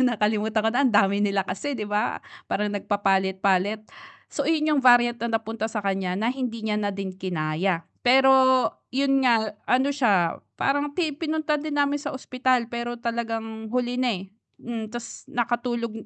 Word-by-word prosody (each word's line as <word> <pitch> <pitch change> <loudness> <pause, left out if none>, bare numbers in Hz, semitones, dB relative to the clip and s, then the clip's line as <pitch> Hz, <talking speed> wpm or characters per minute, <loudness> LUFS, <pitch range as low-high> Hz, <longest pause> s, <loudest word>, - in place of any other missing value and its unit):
nakalimutan 220 -3 +1
ko 225 - +3
na 250 - +2
ang 245 - +1
dami 200 0 +3
nila 200 -2 +1
kasi, 285 +8 -4
'di 215 - -3
ba? 210 0 -1 0.3
Parang 210 0 -1
nagpapalit-palit. 195 0 +1 0.5
So, - - -2
ayun 310 -2 +2
variant 240 -2 +5
na 230 -1 0
napunta 225 0 -4
sa 215 -2 -4
kanya 190 -2 -1
na 220 +4 0
hindi 250 -4 -4
niya 210 -1 0
na 205 -1 0
din 195 -1 -4
kinaya. 175 -1 -2 0.2
Pero 265 +2 +5 0.6
'yun 275 0 +2
nga 225 -3 +3 0.2
ano 260 +3 +3
siya 200 - +2 0.2
parang 285 +1 0
ti 325 -4 0
pinunta 310 0 -1
din 300 -1 -4
namin 285 0 +1
sa - - -4
ospital, 255 -2 0
pero 240 0 -3
talagang 225 -2 -4
huli 245 +1 -1
na, 255 -1 +2
eh. 185 - -8 0.4
Hmm, 230 -2 -5
ta's 240 -1 -8
nakatulog 240 -1 -1
230 Hz, 165 wpm, -25 LUFS, 205-255 Hz, 0.6 s, variant